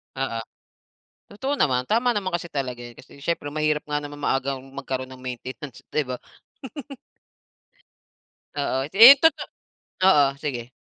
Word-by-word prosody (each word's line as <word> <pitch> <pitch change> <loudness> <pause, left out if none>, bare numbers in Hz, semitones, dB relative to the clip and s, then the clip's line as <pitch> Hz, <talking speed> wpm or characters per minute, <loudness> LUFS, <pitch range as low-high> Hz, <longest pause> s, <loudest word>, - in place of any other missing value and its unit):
Oo. 130 -4 -2 0.9
Totoo 265 +8 -4
naman, 125 - +1
tama 240 +2 +2
naman 200 -3 -2
kasi 170 0 -9
talaga 130 -4 -3
yun 120 - -10
kasi 130 - -16
siyempre 145 +1 -3
mahirap 150 0 0
nga 150 - -1
naman 145 0 -6
maagang 135 -1 -1 0.2
magkaroon 130 -2 -4
ng 130 0 -13
maintenance, 130 +2 -7
di 150 - 0
ba? 125 -1 -5 2.4
Oo, 135 -1 -1
eh, 235 +8 +10
totoo, 320 0 +3 0.6
oo, 145 -7 +5
sige. 125 -4 -4
145 Hz, 135 wpm, -24 LUFS, 130-170 Hz, 2.4 s, eh